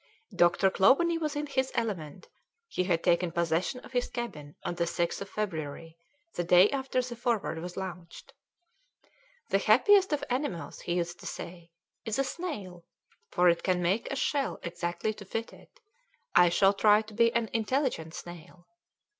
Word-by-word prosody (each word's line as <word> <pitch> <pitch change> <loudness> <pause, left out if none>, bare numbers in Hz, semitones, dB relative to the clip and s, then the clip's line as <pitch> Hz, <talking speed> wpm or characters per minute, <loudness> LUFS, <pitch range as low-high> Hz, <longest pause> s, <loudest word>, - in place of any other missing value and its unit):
Dr. 175 +2 +4
Clawbonny 330 - +4
was 305 -2 -2
in 295 0 -2
his 265 -2 -1
element; 185 -6 -3 0.4
he 185 - -1
had 170 -3 0
taken 175 -1 +2
possession 170 +9 -1
of - - -14
his 245 -1 -1
cabin 150 -12 -6
on - - -2
the 170 0 -1
6th 170 +1 -1
of 200 - -6
February, 165 -6 -4 0.4
the 175 - -2
day 180 +3 +6
after 265 -2 -1
the 245 -1 -6
Forward 235 -8 -1
was 175 +1 -7
launched. 180 -3 -8 1.2
"The 195 - +3
happiest 375 - +5
of 295 - 0
animals," 250 - -3
he 175 - -2
used 175 0 -2
to - - -8
say, 170 -1 -8 0.3
"is 225 -2 -2
a 275 - +2
snail, 215 - -6 0.5
for 180 -1 +3
it 170 -1 +4
can 185 -2 +1
make 190 +6 0
a - - -1
shell 275 +1 -1
exactly 175 +5 -3
to 210 - -11
fit 225 +4 -5
it; - - -18 0.5
I 175 0 +6
shall 195 +3 +4
try 210 +1 +4
to 215 0 -13
be 230 +2 +4
an 235 -1 +1
intelligent 225 - -1
snail." 175 +1 -11
195 Hz, 170 wpm, -29 LUFS, 175-245 Hz, 1.2 s, day